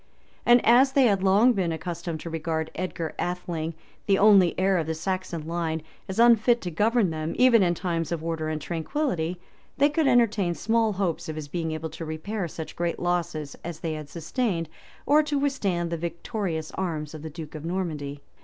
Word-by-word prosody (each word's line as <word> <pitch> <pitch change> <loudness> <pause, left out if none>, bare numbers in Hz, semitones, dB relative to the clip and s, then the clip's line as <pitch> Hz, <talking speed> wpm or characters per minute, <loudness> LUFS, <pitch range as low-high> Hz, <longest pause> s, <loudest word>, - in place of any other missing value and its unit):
And 240 0 +6
as 260 +3 +6
they 275 - +5
had 200 -6 +3
long 205 +6 +5
been 185 -5 0
accustomed 165 0 -4
to 170 - -6
regard 160 0 -2
Edgar 170 -3 -4
Atheling, 170 -2 -3 0.3
the 195 -1 +4
only 195 -4 +5
heir 190 -1 +3
of 160 - -2
the 160 - -1
Saxon 185 -2 -3
line, 165 -1 -2 0.3
as 190 - -4
unfit 235 0 +5
to 175 - -4
govern 210 +2 +2
them 155 0 -3
even 250 -3 +6
in 175 -2 +2
times 165 -2 -2
of 165 -2 -2
order 165 -1 -2
and 155 -1 -2
tranquillity, 175 - -2 0.4
they 285 +1 +5
could 300 0 +1
entertain 215 -8 +3
small 225 +1 +1
hopes 175 -3 -2
of 155 - -4
his 155 -2 -6
being 165 +1 -3
able 155 0 -4
to - - -7
repair 170 +5 -3
such 160 0 -7
great 170 0 -1
losses 170 -5 -2
as 170 -2 -6
they 165 -2 -2
had 155 -2 -7
sustained, 170 - -2 0.4
or 295 +2 +5
to 295 -1 -1
withstand 195 -12 0
the 170 - -1
victorious 170 0 -3
arms 160 -5 -3
of 155 - -8
the 160 - -6
duke 155 -1 -9
of 155 -2 -7
Normandy. 155 -5 -3
175 Hz, 190 wpm, -26 LUFS, 160-205 Hz, 0.4 s, And